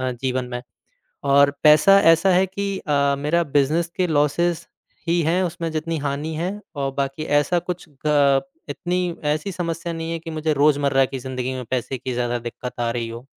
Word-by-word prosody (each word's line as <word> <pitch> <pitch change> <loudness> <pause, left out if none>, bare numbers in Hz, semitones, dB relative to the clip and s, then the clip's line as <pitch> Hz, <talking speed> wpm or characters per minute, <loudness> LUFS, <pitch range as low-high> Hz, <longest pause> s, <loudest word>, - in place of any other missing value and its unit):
अ, 130 0 -1
जीवन 130 +1 -2
में। 125 - -4 0.7
और 140 0 +6
पैसा 155 +6 +7
ऐसा 180 +4 +2
है 185 +2 +4
कि 195 +1 -3
अ, 140 -3 +1
मेरा 160 +4 +1
बिज़नेस 160 +5 +2
के 185 - +2
लॉसेस 160 +2 +1 0.4
ही 170 0 +2
हैं 170 +4 +1
उसमें 170 -1 -3
जितनी 160 +1 -2
हानि 145 +3 -2
है 170 +4 -2 0.3
और 135 -1 -2
बाकी 140 +2 -2 0.2
ऐसा 175 +4 +1
कुछ 175 -1 -6 0.2
ग 140 -2 +4 0.3
इतनी 180 -1 -2 0.2
ऐसी 155 +6 -2
समस्या 170 -1 -3
नहीं 165 0 -4
है 165 - -3
कि 165 0 -9
मुझे 155 0 -1
रोज़मर्रा 140 -2 +3
की 135 - -6
ज़िंदगी 130 0 -4
में 130 - -5
पैसे 130 +1 -2
की 130 0 -5
ज़्यादा 120 0 -1
दिक़्क़त 120 +1 -7
आ 120 -1 0
रही 115 -1 -3
हो। 115 +2 -9
150 Hz, 190 wpm, -22 LUFS, 135-170 Hz, 0.7 s, पैसा